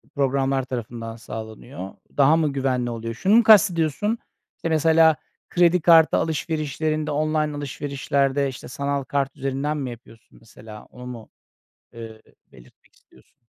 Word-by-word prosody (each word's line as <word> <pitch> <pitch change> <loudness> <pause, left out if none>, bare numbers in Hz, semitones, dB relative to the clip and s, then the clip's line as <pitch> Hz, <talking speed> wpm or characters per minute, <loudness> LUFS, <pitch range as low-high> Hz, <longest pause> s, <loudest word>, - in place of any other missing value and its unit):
programlar 135 -1 +1
tarafından 115 -3 -6
sağlanıyor. 110 -1 -8 0.3
Daha 145 +2 +5
mı 155 -3 0
güvenli 130 -3 -1
oluyor? 115 0 -5
Şunu 190 - +2
mu 235 - +6
kastediyorsun? 205 -1 +4 0.4
İşte 165 - -4
mesela 160 0 +4 0.3
kredi 175 0 +3
kartı 165 -1 +6
alışverişlerinde, 155 -1 -2
online 155 0 0
alışverişlerde, 140 0 -1
işte, 130 - -9
sanal 140 +1 -2
kart 140 0 -2
üzerinden 135 +3 -2
mi 135 -3 -4
yapıyorsun 115 -1 -15
mesela 110 -1 -13
onu 125 0 -13
mu, 120 -3 -9 0.6
eee, 115 -1 -10 0.3
belirtmek 65 -1 -20
istiyorsun? 65 - -26
140 Hz, 130 wpm, -23 LUFS, 120-155 Hz, 0.6 s, mu